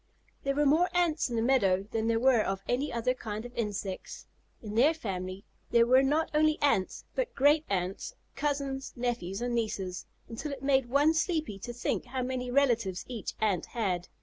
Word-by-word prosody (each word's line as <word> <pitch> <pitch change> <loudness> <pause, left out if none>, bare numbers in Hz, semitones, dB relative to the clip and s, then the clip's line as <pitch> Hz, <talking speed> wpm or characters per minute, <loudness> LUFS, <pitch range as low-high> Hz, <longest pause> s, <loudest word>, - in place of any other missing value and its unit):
There 275 0 -1
were 295 +1 +2
more 320 +6 +4
Ants 335 -5 +2
in 240 - -3
the 225 - +1
meadow 195 -7 +3
than 225 0 -1
there 230 0 +2
were 250 -2 +4
of 195 -1 -2
any 260 +4 0
other 235 +2 0
kind 220 -3 -6
of 245 - -9
insects. 205 -4 -4 0.3
In 210 -2 -7
their 275 +9 +4
family 190 -6 -5 0.2
there 235 -1 +5
were 255 +2 +6
not 295 +4 +1
only 310 0 +3
Ants, 205 -10 +1
but - - -2
great 295 +3 +4
aunts, 185 -1 -2 0.2
cousins, 275 -1 -2
nephews, 240 -5 -2
and 245 0 -1
nieces, 195 -5 -2 0.2
until 275 +6 -5
it 270 -1 -9
made 270 -3 +2
one 290 +5 +4
sleepy 315 - -1
to 240 - -6
think 240 +2 -2
how 255 +1 -3
many 250 0 -3
relatives 235 -8 +1
each 235 -5 -5
Ant 200 -6 0
had. 185 -7 -2
245 Hz, 185 wpm, -30 LUFS, 210-280 Hz, 0.3 s, were